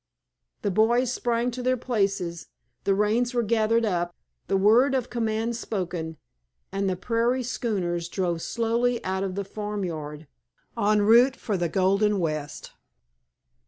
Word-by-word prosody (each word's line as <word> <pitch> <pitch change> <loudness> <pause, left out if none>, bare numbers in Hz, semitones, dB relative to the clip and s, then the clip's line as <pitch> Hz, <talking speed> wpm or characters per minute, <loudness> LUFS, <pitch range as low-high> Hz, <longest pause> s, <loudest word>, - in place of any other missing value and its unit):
The 200 - +1
boys 235 +5 +3
sprang 240 0 0
to 250 +1 -5
their 255 +1 +1
places, 195 -8 -1 0.4
the 195 - +3
reins 230 +5 +1
were 240 - +2
gathered 225 +1 +2
up, 175 -4 -1 0.3
the 195 - +2
word 235 +8 +5
of 250 -2 -2
command 225 0 -1
spoken, 175 -7 -4 0.5
and 195 0 0
the 185 - 0
prairie 235 +6 0
schooners 180 -8 -2
drove 175 -3 -1
slowly 235 +3 0
out 190 0 -1
of 190 -1 -3
the 200 0 -3
farmyard, 175 -8 -5 0.5
en 210 0 +2
route 240 +5 +6
for 215 -6 -3
the 175 -2 0
Golden 200 +4 +2
West. 155 -4 -3
210 Hz, 140 wpm, -26 LUFS, 185-235 Hz, 0.5 s, route